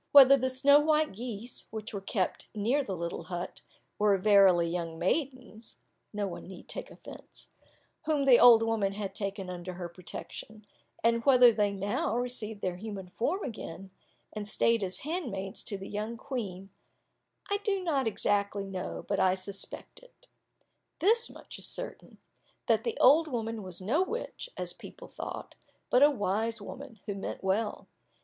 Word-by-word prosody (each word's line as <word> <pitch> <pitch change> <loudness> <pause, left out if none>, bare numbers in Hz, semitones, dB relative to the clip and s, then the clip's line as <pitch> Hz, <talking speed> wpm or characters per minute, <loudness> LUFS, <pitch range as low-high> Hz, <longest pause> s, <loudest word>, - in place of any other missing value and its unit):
Whether 275 -1 +10
the 260 -1 0
snow 280 +3 +5
white 310 0 +2
geese, 230 +2 -6
which 220 +1 -6
were 200 - -4
kept 190 -1 -2
near 240 +8 +1
the 195 -7 -4
little 170 0 -4
hut, 175 0 -5 0.4
were 205 -1 +4
verily 190 -3 +5
young 165 -1 -3
maidens 250 - -2 0.3
(no 210 -1 -2
one 180 -3 -7
need 185 -1 -11
take - - -6
offence,) - - -12 0.6
whom 295 -3 +1
the 255 -3 +7
old 230 -2 +8
woman 220 -3 0
had 195 -1 -4
taken 195 -2 -4
under 180 0 -6
her 175 -1 -5
protection, 190 +4 -8 0.4
and 230 0 +3
whether 250 -4 +7
they 205 -1 +1
now 200 +3 -1
received 230 -4 -3
their 180 -1 -2
human 195 -2 -7
form 295 - -1
again, 195 -5 -7 0.4
and 210 -1 -4
stayed 230 +1 +3
as 185 -1 -2
handmaids 240 - -4
to 205 - -1
the 195 - -8
young 215 +3 -4
Queen, 200 -8 -5 0.8
I 405 - +3
do 405 -2 -1
not 280 -8 +1
exactly 200 -1 0
know, 190 -2 -5
but 200 - 0
I 185 0 +4
suspect 195 +1 -5
it. - - -21 0.7
This 455 +6 +3
much - - -11
is - - -2
certain, - - -6 0.5
that - - +3
the 465 - -2
old 310 +5 +6
woman 225 -4 -3
was 185 -1 -6
no 260 - +2
witch, 475 +5 -4
as - - -3
people - - -12
thought, - - -7 0.4
but 250 - +5
a 290 - +8
wise 225 -2 -1
woman, 260 -5 -9
who 205 - -3
meant 195 0 -6
well. 205 +3 -1
215 Hz, 165 wpm, -30 LUFS, 195-255 Hz, 0.8 s, Whether